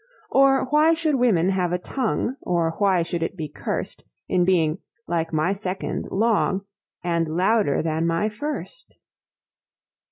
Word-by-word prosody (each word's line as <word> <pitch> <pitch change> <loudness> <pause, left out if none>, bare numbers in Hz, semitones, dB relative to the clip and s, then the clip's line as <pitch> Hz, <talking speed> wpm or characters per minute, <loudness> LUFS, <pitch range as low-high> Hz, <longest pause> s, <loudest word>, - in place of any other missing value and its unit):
Or 270 -1 +4
why 310 +2 +5
should 320 -2 0
women 220 -10 +3
have 185 -2 0
a 180 - +1
tongue, 245 +5 -2
Or 170 -2 0
why 190 -4 +3
should 170 0 -3
it 165 +3 -3
be 155 -2 -4
cursed, 145 - -5 0.2
In 180 -1 +2
being, 165 -4 +2 0.3
like 165 -1 -1
my 160 +4 +1
Second, 195 -1 -4
long, 200 -2 +1 0.4
And 170 -2 0
louder 185 0 +1
than 160 +1 0
my 170 +5 +1
First? 295 - -6
185 Hz, 140 wpm, -23 LUFS, 165-225 Hz, 0.4 s, why